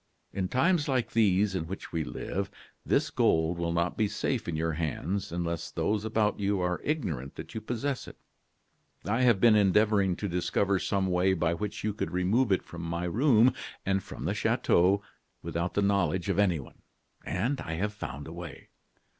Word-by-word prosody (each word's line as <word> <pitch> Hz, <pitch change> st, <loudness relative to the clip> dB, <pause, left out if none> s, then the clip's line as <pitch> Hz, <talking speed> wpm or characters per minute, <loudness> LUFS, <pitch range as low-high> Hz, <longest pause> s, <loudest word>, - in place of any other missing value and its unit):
In 95 Hz, -2 st, -1 dB
times 150 Hz, -, +2 dB
like 130 Hz, -4 st, 0 dB
these 105 Hz, -2 st, +3 dB
in 85 Hz, -4 st, -2 dB
which 95 Hz, +3 st, -7 dB
we 80 Hz, -2 st, -1 dB
live, 100 Hz, +5 st, -4 dB, 0.3 s
this -, -, +1 dB
gold 80 Hz, +2 st, +2 dB
will 85 Hz, 0 st, -1 dB
not 85 Hz, +1 st, 0 dB
be 110 Hz, -, +2 dB
safe -, -, -2 dB
in 85 Hz, -, -2 dB
your 80 Hz, +1 st, 0 dB
hands 85 Hz, +5 st, -2 dB
unless 85 Hz, -1 st, -3 dB
those 105 Hz, 0 st, -1 dB
about 110 Hz, -1 st, 0 dB
you 100 Hz, -1 st, +1 dB
are 90 Hz, 0 st, -1 dB
ignorant 80 Hz, -, -2 dB
that -, -, -8 dB
you 110 Hz, -, -4 dB
possess 125 Hz, +4 st, -3 dB
it. -, -, -11 dB, 0.9 s
I 115 Hz, +5 st, +1 dB
have 120 Hz, -6 st, +4 dB
been 115 Hz, +1 st, +6 dB
endeavoring 100 Hz, -1 st, +3 dB
to 100 Hz, -, -3 dB
discover 95 Hz, +2 st, +1 dB
some 100 Hz, +1 st, 0 dB
way 95 Hz, +1 st, +2 dB
by 85 Hz, -1 st, +1 dB
which 105 Hz, +4 st, -4 dB
you 105 Hz, -1 st, 0 dB
could 105 Hz, -, -3 dB
remove 100 Hz, +7 st, +2 dB
it 95 Hz, -, +2 dB
from 85 Hz, -, -9 dB
my 85 Hz, +1 st, -3 dB
room, 120 Hz, -, +4 dB, 0.3 s
and 95 Hz, 0 st, +1 dB
from -, -, -8 dB
the -, -, 0 dB
chateau, 95 Hz, +4 st, +2 dB, 0.4 s
without 85 Hz, +2 st, -3 dB
the 100 Hz, -, +2 dB
knowledge 95 Hz, -2 st, +1 dB
of 100 Hz, 0 st, +1 dB
anyone; 85 Hz, -9 st, 0 dB, 0.4 s
and 125 Hz, +10 st, -1 dB
I 80 Hz, -, -4 dB
have 105 Hz, +5 st, -2 dB
found 75 Hz, -8 st, -7 dB
a 80 Hz, -, -8 dB
way. 85 Hz, -1 st, -9 dB
95 Hz, 185 wpm, -29 LUFS, 85-105 Hz, 0.9 s, been